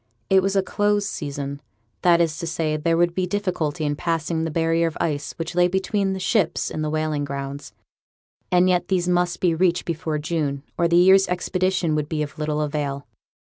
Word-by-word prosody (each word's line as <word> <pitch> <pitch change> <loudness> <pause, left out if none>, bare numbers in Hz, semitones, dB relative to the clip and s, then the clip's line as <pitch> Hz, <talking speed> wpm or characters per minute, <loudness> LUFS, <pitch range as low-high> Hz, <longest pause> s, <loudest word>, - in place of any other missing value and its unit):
It 190 0 +6
was 195 +1 -1
a 195 - +3
'close' 205 +1 +1
season, 140 -4 -5 0.4
that 175 -1 +5
is 165 -3 +1
to 170 - -4
say, 160 -2 -1
there 165 +2 +1
would 175 0 +2
be 185 0 -1
difficulty 175 -6 -2
in 145 0 0
passing 165 0 -1
the - - -2
barrier 165 +1 +1
of 160 - -5
ice 150 -3 -2
which 165 +1 -5
lay 175 0 +4
between 190 +1 0
the 190 - -4
ships 185 -2 0
and 155 - -3
the 155 - -1
whaling 155 -1 -1
grounds; 140 0 -5 0.8
and 180 0 +4
yet 180 -1 +2
these 180 -2 0
must 175 0 +1
be 175 -2 +2
reached 175 +1 +1
before 165 -2 -2
June, 150 -3 -2
or 170 - +2
the 170 0 +3
year's 190 +2 +6
expedition 180 -2 0
would 150 -1 -1
be 155 -2 -1
of 150 +2 -8
little 150 0 -1
avail. 145 -2 -2
165 Hz, 200 wpm, -23 LUFS, 150-180 Hz, 0.8 s, It